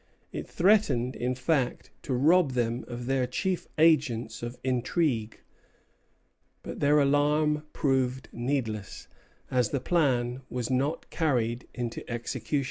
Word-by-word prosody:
It - - -5
threatened, 170 - +3
in 125 +1 -1
fact, 130 0 -1
to 130 - -2
rob 155 +2 +4
them 120 -1 0
of 120 0 -6
their 130 -1 +1
chief 185 +8 -2
agents 135 -8 +2
of 120 +1 -5
intrigue; 125 -2 0 1.2
but - - -7
their 145 +1 +4
alarm 150 +2 +2
proved 130 -2 0
needless, 120 -5 -3 0.4
as 125 -3 +2
the 140 - -1
plan 130 -5 +1
was 125 0 -3
not 135 +5 -1
carried 125 -6 0
into 120 -2 -4
execution. 120 +2 -2
130 Hz, 125 wpm, -28 LUFS, 120-150 Hz, 1.2 s, rob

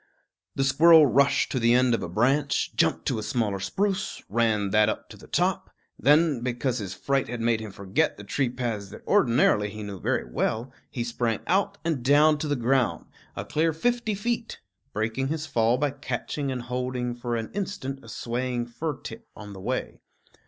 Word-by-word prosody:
The 135 - +1
squirrel 160 +3 +7
rushed 140 +1 +3
to 130 - 0
the 115 +1 +4
end 125 -1 +4
of 115 - 0
a - - -4
branch, 135 - +1
jumped - - +1
to - - 0
a - - -3
smaller 105 -3 -1
spruce, 195 - -2
ran 110 -3 +1
that 105 +1 +4
up - - -4
to - - -11
the - - -15
top; - - 0 0.3
then, 150 -2 +4
because 125 0 -1
his 95 -3 -5
fright 135 -1 0
had 120 0 -5
made 115 -1 +1
him 110 -1 -6
forget 95 0 -1
the 105 - -9
tree 125 +6 0
paths 115 -5 -4
that - - -12
ordinarily 115 - +3
he 105 +1 -7
knew 100 -2 -7
very - - -1
well, 115 - -2 0.2
he 120 - -3
sprang 115 -1 -1
out 200 +2 +1
and 155 -7 -1
down 150 +3 +5
to 155 - -2
the 145 - +1
ground, 125 0 +1 0.3
a - - -5
clear 160 +1 +1
fifty 235 +4 0
feet, 230 +3 -3 0.3
breaking 110 +5 -1
his 155 +2 -3
fall 115 -4 +2
by 145 +1 0
catching 135 +2 -4
and 125 -2 -4
holding 125 0 -3
for 120 0 -3
an 115 -1 -4
instant 160 -9 -4
a - - -12
swaying 120 0 -2
fir 145 +6 -4
tip - - -9
on 105 -1 -9
the 95 - -10
way. - - -3
125 Hz, 195 wpm, -26 LUFS, 115-145 Hz, 0.3 s, squirrel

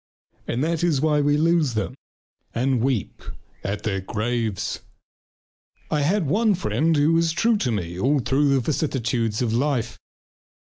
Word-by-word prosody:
And 125 +4 -1
that 165 +1 -1
is 165 -6 +2
why 150 0 +2
we 145 0 +2
lose 160 -5 +2
them 110 +3 -2 0.6
and 125 0 +1
weep 125 -5 -1 0.4
at 100 +1 -3
their 95 -3 -1
graves. 110 0 -2 1.1
I 150 - +1
had 180 +5 +1
one 210 +7 +2
friend 165 -3 +1
who 150 +3 +3
was 165 0 +2
true 215 +7 +2
to 130 -11 -1
me 85 -6 -3
through - - -4
all 140 +2 +3
the 135 +1 +2
vicissitudes 120 -5 -1
of 115 -2 -1
life. 125 -2 -1
135 Hz, 150 wpm, -23 LUFS, 115-160 Hz, 1.1 s, who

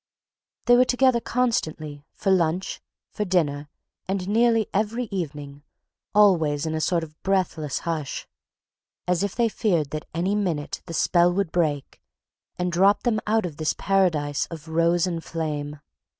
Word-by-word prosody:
They 245 - +6
were 250 - +6
together 255 -1 +3
constantly, 155 -13 -2
for 195 - -1
lunch, 180 0 0 0.3
for 210 - -2
dinner, 150 -7 0 0.4
and 190 -1 -2
nearly 225 0 +3
every 220 +4 0
evening—always 150 +1 -1
in 160 - -2
a 160 - -1
sort 170 0 +1
of 155 -1 -12
breathless 180 -6 0
hush, 160 -5 -4 0.8
as 180 0 +1
if 200 -1 -2
they 235 -1 +2
feared 175 -10 0
that 155 0 -5
any 175 +4 -1
minute 175 -8 -2
the 165 - -5
spell 175 +2 +3
would 185 -2 -1
break 150 -5 -1 0.6
and 180 0 -1
drop 195 +4 +3
them 230 -3 +1
out 220 -1 +2
of 160 -4 -6
this 155 -1 0
paradise 165 -7 +1
of 160 -2 -9
rose 170 +2 +2
and 170 -3 -3
flame. 150 -2 -4
175 Hz, 150 wpm, -24 LUFS, 155-200 Hz, 0.8 s, They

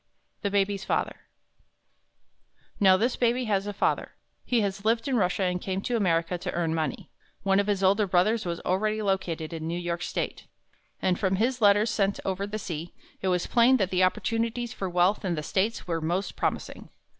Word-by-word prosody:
THE 200 - 0
BABY'S 200 0 0
FATHER - - -1 1.6
Now, 190 -3 +6
this 235 +5 +1
Baby 245 +1 +1
has 200 -2 0
a - - -2
father. 200 - -1 0.3
He 240 -3 +1
has 200 -1 -2
lived 225 +2 +1
in 270 - +1
Russia 195 -2 +1
and 180 -1 0
came 190 0 -2
to 245 - -2
America 175 -4 +1
to 180 +1 -4
earn 165 -2 0
money. 160 -1 -3 0.3
One 195 0 +3
of 200 - 0
his 200 -2 0
older 200 +2 +3
brothers 210 +5 +2
was 170 -1 -3
already 215 +3 0
located 180 -5 -2
in 160 -1 -4
New 170 +1 -2
York 175 0 -3
State, - - -4 0.6
and 180 -1 +2
from 190 -1 +1
his 240 +5 0
letters 205 +1 +5
sent 200 -2 0
over 195 +1 -2
the 210 +1 -4
sea, 170 -4 -6 0.3
it 190 - -1
was 180 -1 +1
plain 245 +2 +4
that 195 -5 0
the 185 0 +3
opportunities 230 +5 0
for 190 - -4
wealth 180 +4 +2
in 180 -3 0
the 150 - -4
States 205 +8 -1
were 165 -2 -2
most 175 +5 -2
promising. - - -3
195 Hz, 190 wpm, -27 LUFS, 180-215 Hz, 1.6 s, Now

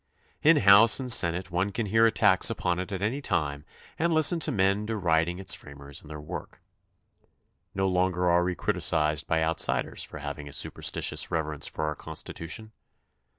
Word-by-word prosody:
In 160 +1 +5
House 105 +1 +6
and 130 -2 -2
Senate 90 -3 +3
one 90 +4 -1
can 115 +2 -3
hear 110 +3 +3
attacks 115 - +3
upon 90 -1 -2
it 95 +3 -6
at 95 0 -4
any 125 +7 -2
time 75 - -2 0.4
and 170 +1 +1
listen 160 +2 +4
to - - +1
men 100 -1 +1
deriding 85 -5 0
its 95 - +1
framers 70 +1 -9
and 75 - -16
their 75 -1 -8
work. 75 - -9 1.2
No 95 0 0
longer 90 -1 0
are 85 0 +3
we 90 0 -2
criti - - -2
cised 75 0 0
by 80 -1 +1
outsiders 80 0 -1
for - - -8
having 75 0 -7
a - - -8
superstitious - - -1
reverence 75 -3 -3
for 80 - -4
our 75 - -2
Constitution. 80 +7 -8
90 Hz, 175 wpm, -27 LUFS, 80-105 Hz, 1.2 s, House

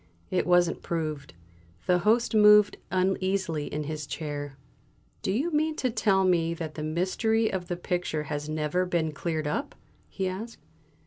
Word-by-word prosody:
It 180 - +1
wasn't 175 -1 +3
proved." 155 - -4 0.5
The 180 -1 +3
Host 225 +6 +2
moved 210 -1 +6
uneasily 185 -4 0
in 150 +1 -2
his 150 0 -5
chair. 145 -2 -5 0.6
"Do - - -1
you 280 - 0
mean 310 +1 +1
to 255 -4 -1
tell 200 -4 +2
me 170 -3 +2
that 160 -2 -5
the 155 - -6
mystery 190 +8 0
of 180 -2 -3
the 175 - -3
picture 175 -3 -2
has 150 +1 -4
never 155 +3 0
been 165 -3 0
cleared 155 +1 -3
up?" 215 - -2 0.3
he 190 -2 -2
asked. 210 +5 -6
175 Hz, 155 wpm, -27 LUFS, 155-200 Hz, 0.6 s, moved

